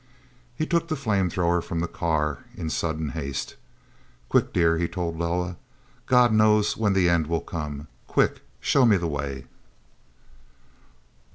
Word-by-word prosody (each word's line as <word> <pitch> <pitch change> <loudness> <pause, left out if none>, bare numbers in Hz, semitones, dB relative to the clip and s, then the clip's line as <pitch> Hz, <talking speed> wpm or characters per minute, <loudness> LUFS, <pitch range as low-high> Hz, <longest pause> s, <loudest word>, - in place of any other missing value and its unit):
He 155 - -1
took 170 0 0
the 160 - -1
flame 105 - 0
thrower 85 0 +1
from 85 0 -4
the 85 - -1
car 75 -4 -1 0.2
in 80 -3 -3
sudden 80 -2 -2
haste. 70 -3 -4 0.7
"Quick, - - +2
dear," 85 -2 +2
he 85 - +1
told 85 -3 -3
Loah. 90 +1 -1 0.5
"God 125 -2 +5
knows 105 -1 +4
when 105 -3 +1
the 95 -2 +3
end 85 -3 +2
will 85 0 0
come. 75 -2 -6 0.2
Quick, - - +1 0.2
show 135 - +3
me 110 -5 +5
the 85 - -3
way." 70 -3 -4
85 Hz, 150 wpm, -25 LUFS, 80-105 Hz, 0.7 s, God